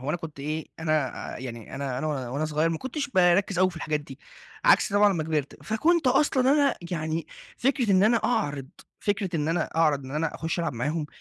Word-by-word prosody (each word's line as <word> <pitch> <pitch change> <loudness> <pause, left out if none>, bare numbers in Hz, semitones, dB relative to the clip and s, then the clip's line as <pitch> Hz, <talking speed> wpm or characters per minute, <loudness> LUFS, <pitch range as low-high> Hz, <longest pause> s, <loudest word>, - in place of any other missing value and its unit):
هو 130 - -6
أنا 155 - +1
كنت 160 -5 -9
إيه، 155 +2 -3
أنا 155 -5 +1 0.3
يعني 120 -3 -8
أنا 135 -2 -3
أنا 155 - -2 0.2
وأنا 140 +5 -2
صغير 155 +1 +1
ما 165 -1 -2
كنتش 280 +2 -4
باركز 185 -1 +3
أوي 185 0 +4
في 170 - -13
الحاجات 155 -1 -1
دي، 140 -2 -12 0.5
عكس - - +5
طبعًا 205 0 +5
أمّا 165 - -1
كبرت. 150 -3 -3
فكنت 310 +8 +2
أصلًا 265 0 +3
أنا 285 -2 +3 0.2
يعني 160 -1 -2 0.3
فكرة 250 -4 +1
إن 185 0 +5
أنا 225 +3 +5
أعرض 145 - -1 0.3
فكرة 200 -4 -1
إن 150 0 -1
أنا 165 +2 +1
أعرض 150 -4 +2
إن 130 - -9
أنا 155 +2 -2
أخش 165 +2 -3
ألعب 165 -3 -1
معاهم 150 +6 -2
165 Hz, 205 wpm, -26 LUFS, 150-205 Hz, 0.5 s, عكس